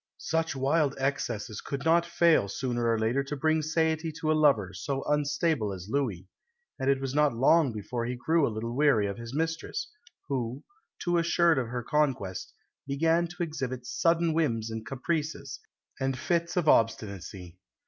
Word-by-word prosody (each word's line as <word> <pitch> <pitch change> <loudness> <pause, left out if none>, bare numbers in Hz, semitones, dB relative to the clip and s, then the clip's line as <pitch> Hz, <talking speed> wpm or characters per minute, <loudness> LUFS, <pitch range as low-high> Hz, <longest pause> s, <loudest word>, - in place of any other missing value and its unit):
Such 165 -1 -1
wild 140 +2 +1
excesses 120 -5 -2
could 140 +1 -5
not 170 +1 +4
fail 165 -11 +3
sooner 120 +2 -2
or 115 - +2
later 115 +5 +1
to 140 +2 -5
bring 155 +2 +1
satiety 160 +1 0
to 155 0 -1
a - - +5
lover 140 -11 +3
so 135 +9 -3
unstable 150 -5 0
as 95 +1 -7
Louis; 115 -11 -1 0.5
and 135 +1 0
it 135 -1 +3
was 135 -1 -3
not 150 -3 +3
long 140 +3 +4
before 115 +3 -4
he 125 +1 -3
grew 160 +4 +2
a - - 0
little 115 +2 -4
weary 135 -7 +4
of 100 +2 -4
his 115 +3 -7
mistress, 165 - -2 0.4
who, 130 -1 -3 0.3
too 175 -1 +1
assured 170 -2 +3
of 125 - -2
her 120 +1 -4
conquest, 130 - -1 0.4
began 165 +5 +2
to 175 +1 -4
exhibit 130 -6 -4
sudden 165 +4 +1
whims 115 -9 0
and 110 0 -6
caprices, 155 +3 -3 0.4
and 135 -1 -1
fits 170 +5 -1
of 170 -3 +1
obstinacy. 95 - 0
135 Hz, 170 wpm, -28 LUFS, 115-160 Hz, 0.5 s, a